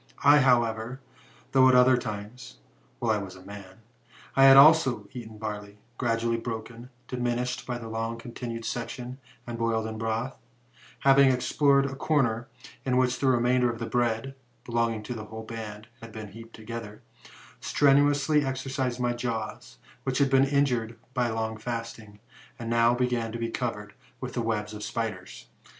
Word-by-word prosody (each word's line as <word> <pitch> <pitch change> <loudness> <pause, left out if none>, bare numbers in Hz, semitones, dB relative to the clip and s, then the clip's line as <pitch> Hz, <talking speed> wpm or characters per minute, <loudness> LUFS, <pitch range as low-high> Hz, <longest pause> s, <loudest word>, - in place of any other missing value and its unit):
' - - -14
I, 150 - +7
however, 120 -1 +2 0.5
though 130 -1 +6
at 130 - +5
other 125 +1 +6
times 110 - -6 0.4
[while 115 -2 0
I 105 - +1
was 95 -1 -8
a 95 - -14
man] 100 0 -11 0.5
I 135 - +6
had 135 0 +9
always 155 +1 +8 0.3
eaten 110 -3 -8
barley, 105 -1 -6 0.2
gradually 115 -1 0
broken, 115 +1 -6 0.2
diminished 125 0 -2
by 125 -1 -2
a 115 -1 -8
long 115 +1 -3
continued 115 -1 -6
section, 125 +1 -5 0.3
and 120 -1 -6
boiled 115 -1 0
in 110 0 -5
broth; 115 +3 -2 0.7
having 135 0 +6
explored 140 +2 +3
a 135 0 -4
cor 145 +1 +2
ner, 115 0 -2 0.4
in 130 -1 +1
which 130 -1 +2
the 135 - +1
remainder 125 0 +3
of 115 - -7
the 115 - -4
bread, 120 +2 -1 0.3
belonging 115 -2 -1
to 115 - -5
the 110 -2 -7
whole 110 +1 -8
band, 110 -1 -7
had 115 -1 -10
been 110 -1 -8
heaped 115 +2 -12
together, 110 -1 -8 0.6
stretiuously 145 +1 +3
exercised 130 -1 -2
my 120 -1 +1
jaws, 115 -3 -5 0.3
which 130 -1 -1
had 140 -2 +2
been 135 0 +5
injured 125 -5 0 0.2
by 125 -2 +1
long 110 0 -2
fasting, 115 -2 -6 0.4
and 115 -2 -5
now 115 +1 +4
began 120 -2 -1
to 115 - -4
be 115 0 -3
covered 105 -5 -4 0.3
with 125 -2 -6
the 120 - -1
webs 110 -2 -2
of 105 - -7
spiders. 105 -4 -5
115 Hz, 165 wpm, -27 LUFS, 110-130 Hz, 0.7 s, had